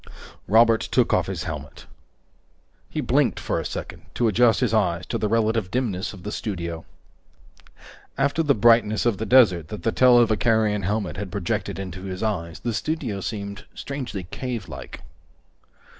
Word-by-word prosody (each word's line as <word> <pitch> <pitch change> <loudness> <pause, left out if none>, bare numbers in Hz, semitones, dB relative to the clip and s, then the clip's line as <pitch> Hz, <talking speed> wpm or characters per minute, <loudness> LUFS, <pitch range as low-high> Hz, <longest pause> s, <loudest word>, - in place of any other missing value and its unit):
Robert 115 +2 +5
took - - +1
off - - +2
his - - -4
helmet. 75 -3 -7 1.0
He - - -3
blinked - - +1
for - - -2
a - - -3
second - - -7
to 120 - +2
adjust 110 +1 +4
his 120 -3 +1
eyes 85 -5 +1
to - - -3
the 105 - 0
relative 110 -3 +1
dimness 110 -5 -2
of 95 -4 -12
the 105 - -5
studio. 85 -7 -4 1.3
After 140 +4 +1
the 145 -3 +3
brightness 110 -1 +4
of 115 -5 +1
the 110 - -3
desert 95 - +5
that 105 - -8
the 115 - +1
televicarion 110 -4 +3
helmet 105 +1 -2
had 100 -2 -5
projected 95 -3 -2
into 95 -1 -6
his 95 +2 -5
eyes, 85 -7 -3
the 120 - -2
studio 120 -5 -2
seemed 100 0 -5
strangely 130 -9 -5
cavelike. 115 -11 -6
110 Hz, 155 wpm, -24 LUFS, 95-120 Hz, 1.3 s, Robert